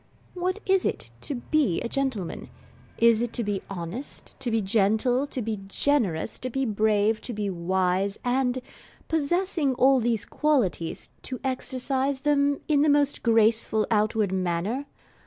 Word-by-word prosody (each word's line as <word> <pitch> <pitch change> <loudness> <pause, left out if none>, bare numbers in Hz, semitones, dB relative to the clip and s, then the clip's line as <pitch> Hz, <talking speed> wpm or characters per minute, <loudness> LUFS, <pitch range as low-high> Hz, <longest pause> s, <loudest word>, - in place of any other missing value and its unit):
What 365 +2 -2
is 385 -1 +3
it - - -2
to 285 - -3
be 255 - +1
a - - -2
gentleman? 255 -9 -3 0.5
Is 230 -1 +4
it 240 -1 -2
to 235 - 0
be 205 -2 -2
honest, 195 +8 -6
to 260 -2 -2
be 225 -1 +1
gentle, 220 +6 +2
to 255 -4 -3
be 215 -1 -3
generous, 200 - +1
to 255 - -3
be 270 +2 -1
brave, 215 0 +1
to 245 - -4
be 205 -2 -2
wise, 185 +2 0
and, 250 0 0 0.4
possessing 320 -2 +1
all 265 +1 +5
these 230 -2 0
qualities, 245 - 0
to 255 - -5
exercise 265 +1 -1
them 285 -1 +2
in 295 -2 +3
the 305 - +4
most 285 -1 +2
graceful 225 -1 +3
outward 215 -2 +2
manner? 190 +9 -1
240 Hz, 150 wpm, -26 LUFS, 205-275 Hz, 0.5 s, all